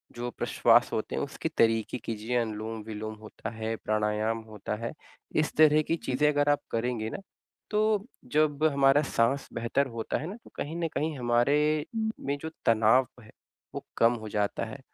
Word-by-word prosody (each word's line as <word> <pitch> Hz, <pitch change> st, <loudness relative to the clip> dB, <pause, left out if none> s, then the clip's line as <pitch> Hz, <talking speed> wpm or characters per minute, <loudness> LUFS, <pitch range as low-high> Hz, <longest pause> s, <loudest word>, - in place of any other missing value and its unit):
जो 120 Hz, +1 st, -3 dB
प्रश्वास -, -, +3 dB
होते -, -, -2 dB
हैं, -, -, -1 dB
उसके -, -, -4 dB
तरीके 115 Hz, 0 st, +2 dB
कीजिए, 115 Hz, +1 st, -4 dB
अनुलोम-विलोम 110 Hz, -1 st, -4 dB
होता 110 Hz, -, -7 dB
है, 110 Hz, 0 st, -3 dB
प्राणायाम 110 Hz, +1 st, 0 dB
होता 105 Hz, 0 st, -4 dB
है। 115 Hz, +2 st, -4 dB, 0.5 s
इस 155 Hz, -, -2 dB
तरह 155 Hz, 0 st, +6 dB
की 165 Hz, -, +2 dB
चीज़ें 135 Hz, +4 st, +2 dB
अगर 145 Hz, 0 st, +2 dB
आप 145 Hz, -, +3 dB
करेंगे 115 Hz, -1 st, -1 dB
ना, -, -, -5 dB, 0.5 s
तो 210 Hz, -1 st, +2 dB, 0.3 s
जब 150 Hz, -1 st, +2 dB
हमारा 140 Hz, +1 st, +5 dB
साँस 120 Hz, +5 st, +2 dB
बेहतर 120 Hz, +4 st, 0 dB
होता 115 Hz, -2 st, -3 dB
है 155 Hz, -, -5 dB
ना 195 Hz, -, -6 dB
तो -, -, -15 dB
कहीं 155 Hz, +3 st, -4 dB
न 170 Hz, -1 st, 0 dB
कहीं 155 Hz, -1 st, -1 dB
हमारे 145 Hz, +5 st, +2 dB, 0.3 s
में 140 Hz, +1 st, -2 dB
जो 160 Hz, -, -4 dB, 0.2 s
तनाव 115 Hz, +3 st, +5 dB
है, 110 Hz, -, -16 dB, 0.5 s
वो -, -, -5 dB
कम 115 Hz, +1 st, +5 dB
हो 110 Hz, -, -6 dB
जाता 105 Hz, 0 st, -1 dB
है, 125 Hz, +5 st, -8 dB
120 Hz, 175 wpm, -28 LUFS, 110-145 Hz, 0.5 s, तरह